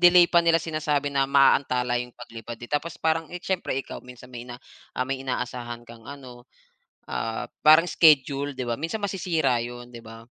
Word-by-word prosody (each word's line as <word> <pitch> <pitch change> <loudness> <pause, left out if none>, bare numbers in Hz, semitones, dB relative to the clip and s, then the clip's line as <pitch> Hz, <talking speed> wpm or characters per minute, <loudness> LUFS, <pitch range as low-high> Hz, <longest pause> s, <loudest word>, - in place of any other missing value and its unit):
delay 175 0 +8
pa 170 0 +4
nila 165 -1 +4
sinasabi 150 -3 -1
na 135 -1 +1
maaantala 125 -3 +3
yung 125 0 -9
paglipad 115 -1 -9
eh, 120 0 -11
tapos 160 +3 -2
parang, 160 0 0
eh, 180 0 -8
siyempre 185 -8 -2
ikaw, 135 - -5
minsan 125 0 -14
may 120 0 -8
na 120 - -7 0.5
may 135 0 -3
inaasahan 125 -2 -4
kang 115 0 -14
ano, 130 -3 -11 0.6
ah, 115 0 -3
parang 155 +2 +7
schedule, 145 -4 +3
'di 130 - -4
ba? 120 0 -3
Minsan 205 +7 -4
masisira 170 -10 0
'yon, 120 +1 -7
'di 120 - -9
ba, 115 0 -12
135 Hz, 180 wpm, -25 LUFS, 120-160 Hz, 0.6 s, delay